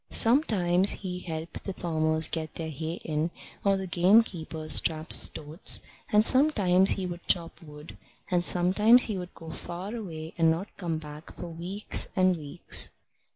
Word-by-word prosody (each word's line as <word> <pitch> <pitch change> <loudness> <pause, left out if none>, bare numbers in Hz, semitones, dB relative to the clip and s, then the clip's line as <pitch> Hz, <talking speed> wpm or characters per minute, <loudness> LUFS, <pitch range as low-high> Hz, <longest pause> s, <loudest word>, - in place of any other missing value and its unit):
Sometimes 200 - +3
he 180 -2 -7
helped 165 -2 -8
the 195 - -6
farmers 160 -2 +1
get 160 -2 -5
their 160 -1 -5
hay 160 +3 -6
in, 155 +1 -2 0.3
or 195 -1 +1
the 190 - -5
gamekeepers 175 -4 +3
trap 155 -1 -2
stoats, 155 +4 +4 0.3
and 210 +1 +3
sometimes 205 -10 +3
he 190 - -5
would 175 -1 -9
chop 170 -2 -1
wood, 150 -1 -14 0.3
and 175 -1 +1
sometimes 210 +8 +4
he 205 -4 -3
would 180 0 -10
go 160 -1 -11
far 180 +8 -7
away 165 -8 -8
and 165 -1 +3
not 170 +6 -4
come 170 -4 -4
back 150 0 -11
for 175 - -9
weeks 175 +5 0
and 185 -1 +2
weeks. 150 -4 -1
175 Hz, 155 wpm, -26 LUFS, 160-195 Hz, 0.3 s, stoats